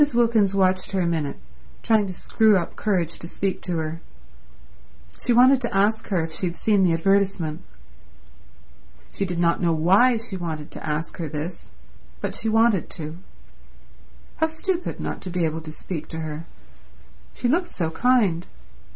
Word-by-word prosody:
Wilkins 225 -5 +3
watched 185 0 +1
her 190 - +1
a - - +1
minute, 160 -4 -1 0.5
trying 215 -3 +3
to - - -4
screw 215 +3 +3
up 170 - -3
courage 180 -6 -1
to 170 - -8
speak 190 +1 -2
to 180 -2 -3
her. 160 +1 -4 1.2
She 245 - +2
wanted 255 +2 +6
to 235 -5 -1
ask 215 +3 +2
her 180 -5 0
if 160 - -5
she 180 - -1
had 175 - -5
seen 210 -3 +2
the 180 -2 +4
advertisement. 185 -2 +1 1.5
She 200 - -2
did 180 -2 -4
not 170 0 +2
know 170 -2 +2
why 195 +10 +4
she 220 -4 -5
wanted 160 -4 -5
to - - -7
ask 155 +1 -3
her 165 -4 -4
this, 160 +4 -6 0.5
but - - -3
she 225 - -1
wanted 225 -4 +3
to. 155 0 -6 1.2
How 320 - +2
stupid 340 +3 -3
not - - -4
to 185 - -6
be 175 -1 0
able 160 +1 -2
to 155 -1 -8
speak 155 0 -6
to 160 0 -5
her. 155 +1 -6 0.9
She 245 - -1
looked 345 +8 +1
so 165 -3 -2
kind. 205 -5 +2
185 Hz, 170 wpm, -24 LUFS, 165-220 Hz, 1.5 s, wanted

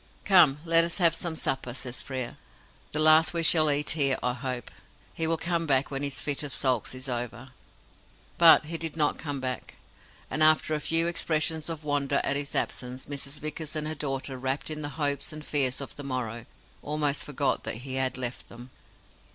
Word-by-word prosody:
"Come, 175 -8 +5
let 165 0 +6
us 170 0 -1
have 170 -4 +4
some 165 0 -4
supper," 130 -5 -3
says 125 -1 -4
Frere. 130 -3 -5 0.5
"The - - -3
last 155 +1 +6
we 165 - 0
shall 155 -1 +6
eat 145 0 +2
here, 140 -4 +3
I 125 - 0
hope. 125 -2 -5 0.4
He 160 - -1
will 165 0 +1
come 170 0 -2
back 135 0 +1
when 135 0 -3
his 140 -1 -3
fit 145 -2 0
of 145 -3 -5
sulks 130 -2 -1
is 130 +1 -6
over." 120 0 -5 0.9
But 165 -2 +7
he 165 +1 -5
did 165 -1 -3
not 150 -2 +1
come 145 -3 -4
back, 130 -2 -5 0.5
and, 150 - -2
after 155 0 +5
a 150 - -1
few 165 +2 +3
expressions 160 -2 -1
of 160 -2 -6
wonder 145 -1 0
at 140 - 0
his 145 0 -3
absence, 125 +1 -2
Mrs. 140 0 -5
Vickers 155 +1 -5
and 155 0 -2
her 155 - -2
daughter, 135 -3 -4
rapt 135 +4 -3
in 155 0 -4
the 145 - -3
hopes 145 -2 -2
and 155 -1 -9
fears 135 -3 +2
of 140 - -8
the 145 - -9
morrow, 120 -4 -5 0.3
almost 150 -1 0
forgot 140 -1 -1
that - - -2
he 130 - -4
had 130 -1 -1
left 125 -1 -5
them. 120 +2 -12
145 Hz, 200 wpm, -27 LUFS, 130-155 Hz, 0.9 s, But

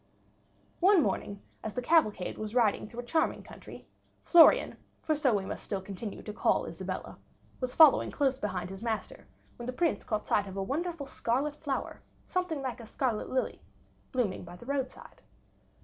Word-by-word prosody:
One 370 -2 +6
morning, 200 -1 -3 0.2
as 220 - -5
the 250 - -1
cavalcade 215 - +2
was 215 +1 -5
riding 225 -4 +2
through 235 +2 -6
a - - -14
charming 320 +6 0
country, - - -12 0.4
Florian, 340 -2 +6 0.3
for 310 - +1
so 275 -6 +2
we 195 -1 -1
must - - -5
still 200 - -3
continue 195 +2 -7
to 210 - -6
call - - +2
Isabella, - - -6 0.4
was 255 -1 -3
following 315 -4 +7
close 270 -2 0
behind 190 -5 -3
his 195 - -8
master, 225 -2 -4 0.3
when 240 - -7
the 255 - -3
Prince 335 +3 0
caught 215 -1 -2
sight 205 -1 +1
of 195 0 -7
a 195 - -1
wonderful 315 - -3
scarlet 275 +3 -1
flower, 285 -3 -4 0.2
something 360 -6 -2
like 255 -2 -4
a 230 - -10
scarlet 235 -3 -1
lily, 260 - -1 0.5
blooming 240 -7 -1
by 175 0 -10
the 180 - -13
roadside. 270 -1 -4
245 Hz, 175 wpm, -30 LUFS, 210-285 Hz, 0.5 s, following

